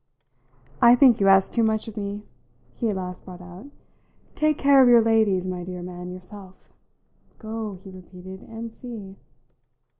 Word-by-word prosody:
"I 235 +1 +7
think 250 -2 +5
you 195 - +3
ask 195 0 +5
too 235 - 0
much 220 -1 0
of 220 - -9
me," 205 0 -5 0.5
he 230 - -2
at 205 - -2
last 180 -1 -6
brought 180 -2 -11
out. 180 +6 -12 0.7
"Take 305 -1 +1
care 280 -1 +5
of 250 - +6
your 235 -2 +6
ladies, 220 -5 +2
my 180 -1 -4
dear 180 0 -7
man, 180 0 -8
yourself! 185 +1 -12 0.6
Go," 220 -2 -6
he 190 +1 -13
repeated, 185 0 -12
"and 225 0 -9
see." 220 -5 -10
200 Hz, 160 wpm, -24 LUFS, 185-225 Hz, 0.7 s, I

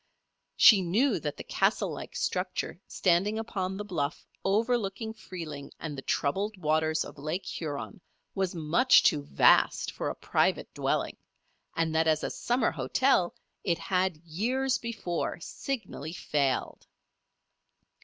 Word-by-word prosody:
She 205 -4 +8
knew 210 +11 +2
that - - -4
the - - -6
castle - - +1
like - - -8
structure - - -2
standing 195 +4 +2
upon 190 -4 -3
the 205 - -5
bluff 155 -6 -3 0.2
overlooking 220 +1 0
Freeling 165 -9 -8
and 155 -3 -5
the 135 - -6
troubled 195 +11 -1
waters 155 -1 +1
of 150 - -11
Lake 155 +6 -3
Huron, 160 +5 -5 0.3
was 190 -2 -1
much 170 +11 +5
too 150 -7 +3
vast 140 - +4
for - - -3
a - - -4
private - - 0
dwelling, - - -1 0.6
and 165 -1 0
that 160 0 +2
as 155 -1 +2
a - - -2
summer 245 -1 0
hotel 175 - +2 0.3
it 170 -3 +1
had 185 -3 0
years 235 +12 -1
before 210 -9 -3
signally 170 - -5
failed. 140 -6 -1
180 Hz, 135 wpm, -29 LUFS, 155-215 Hz, 0.6 s, She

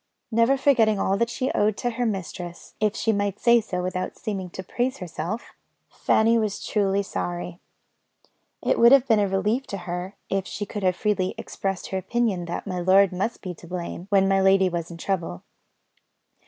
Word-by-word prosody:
Never 230 +4 +3
forgetting 240 -6 +3
all 195 - +1
that 235 +2 +1
she 255 +2 -2
owed 210 0 +1
to 245 - -1
her 240 +1 -1
mistress 180 -4 -5
if 215 0 +1
she 225 - +1
might 205 -1 -1
say 235 -1 +5
so 180 -4 -4
without 185 0 -3
seeming 195 -5 -4
to 190 - -7
praise 250 +7 -2
herself 180 +4 -5 0.4
Fanny 230 +1 +3
was 210 -2 -2
truly 200 -1 +1
sorry. 175 -2 -4 1.0
It - - +1
would 235 +1 +8
have 275 -1 +5
been 225 -3 +4
a 205 - +2
relief 210 +7 0
to 200 - -4
her, 180 +3 -4
if 195 0 -1
she 205 - -4
could 205 +1 -5
have 185 -2 +2
freely 200 -3 0
expressed 195 -2 -4
her 190 - -1
opinion 200 -2 -1
that 170 - -4
my 185 -3 -3
lord 190 +2 +5
must 195 +6 -3
be 185 -2 -4
to 170 - -14
blame, 175 0 -5
when 195 -1 +4
my 195 0 +3
lady 190 -1 +4
was 170 -2 -4
in 170 - -8
trouble. 170 - -3
195 Hz, 190 wpm, -25 LUFS, 185-220 Hz, 1.0 s, would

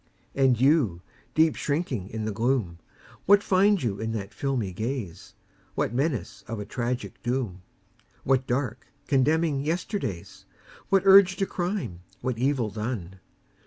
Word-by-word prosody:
And 130 -4 +3
You, 130 - +3 0.3
deep 160 0 +4
shrinking 140 - -2
in 110 -1 -4
the 110 - -1
gloom, 110 -6 0 0.5
What 205 +1 +6
find 195 -1 +3
you 100 -5 -1
in 110 0 -2
that 100 -3 -5
filmy 125 -9 -2
gaze? 110 -3 -5 0.4
What - - -1
menace 125 -8 -2
of 115 -1 -4
a 105 - -5
tragic 120 +3 -4
doom? 120 -7 -2 0.6
What 130 -1 +2
dark, 125 -2 -2 0.2
condemning 145 +1 +2
yesterdays? 155 - -3 0.4
What 195 -1 +4
urge 195 -1 +8
to 195 - 0
crime, 180 - -3 0.2
what 125 -3 -2
evil 130 -4 +1
done? 105 -5 -5
130 Hz, 135 wpm, -26 LUFS, 110-155 Hz, 0.6 s, urge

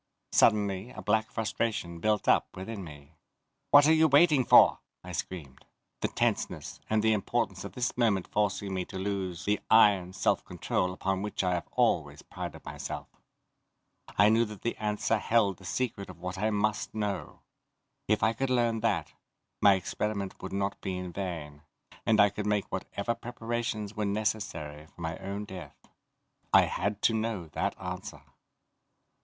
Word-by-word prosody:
Suddenly 100 -1 +3
a - - -9
black 110 +1 +1
frustration 105 -6 -2
built 105 +2 +1
up - - +3
within 100 +2 -6
me. 75 -2 -12 0.6
"What 145 0 +8
are 160 - +6
you 160 0 +5
waiting 145 -1 +5
for?" - - +7 0.2
I - - -8
screamed, 70 -8 -6 0.4
the - - 0
tenseness, - - -2
and 110 0 +2
the 110 0 +4
importance 105 -3 -1
of - - -7
this 125 0 -1
moment 110 -7 +2
forcing 100 -1 -1
me 95 -1 -1
to - - -8
lose 95 -3 -3
the 105 +1 +1
iron 100 -5 +5
self 95 - +1
control 90 - -1
upon 95 +1 -2
which 105 -1 -2
I 90 -1 +1
have 85 - -3
always - - +1
prided - - -7
myself. - - -6 1.1
I 105 +1 +6
knew 115 +1 +4
that 105 -2 -10
the 115 - -1
answer 105 +1 0
held 105 -5 +2
the 95 - -15
secret 110 -2 -2
of 90 - -10
what 90 +1 -5
I 110 +2 +1
must 105 0 -1
know. 105 -2 -3 0.7
If 105 0 +2
I 110 +1 +4
could 135 +2 -2
learn 120 -3 +2
that, 95 -10 0 0.5
my 100 -1 +7
experiment 100 +1 -3
would 95 - -6
not 100 0 -2
be 95 -1 -3
in 90 -1 -6
vain, 80 -6 -5 0.5
and 110 -1 +4
I 105 -1 +6
could 105 +1 -4
make 105 -1 +1
whatever 100 +4 -2
preparations 115 -3 -4
were 105 -1 -1
necessary 100 -8 -2
for - - -23
my 80 -1 -4
own 100 +2 -5
death. 95 -4 -9 0.7
I - - +7
had 100 0 -2
to 115 - +4
know 110 -7 -2
that - - -2
answer. - - -6
100 Hz, 165 wpm, -29 LUFS, 95-110 Hz, 1.1 s, What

